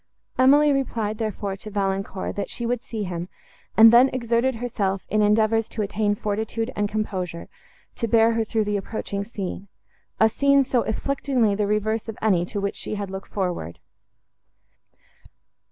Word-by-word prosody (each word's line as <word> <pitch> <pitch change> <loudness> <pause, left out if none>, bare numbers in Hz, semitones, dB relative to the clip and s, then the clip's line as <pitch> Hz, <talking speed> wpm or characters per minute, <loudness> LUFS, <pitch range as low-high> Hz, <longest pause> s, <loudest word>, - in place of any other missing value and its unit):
Emily 290 +3 +6
replied, 225 -5 -2
therefore, 205 -3 -3
to 215 - -9
Valancourt, 195 -1 -2
that 200 - -3
she 240 - -5
would 245 0 -1
see 220 -3 -5
him, 175 -1 -5 0.5
and 225 +1 +9
then 250 +3 +7
exerted 240 +1 0
herself 210 -5 -2
in 215 +1 +2
endeavours 215 +1 +2
to 215 - -3
attain 205 +1 0
fortitude 220 +2 -3
and 205 0 0
composure, 185 -6 -3 0.5
to 230 - -1
bear 225 +1 +4
her 225 0 +1
through 220 0 0
the 205 0 -1
approaching 200 0 -4
scene—a 200 +1 -4
scene 280 +4 +3
so 255 -2 +1
afflictingly 250 -1 0
the 205 0 0
reverse 215 +2 -1
of 220 - -6
any, 185 -5 +2
to 205 +3 -4
which 200 0 -2
she - - -4
had 200 -2 -5
looked 190 0 -7
forward! 175 - -3
215 Hz, 155 wpm, -24 LUFS, 200-230 Hz, 0.5 s, and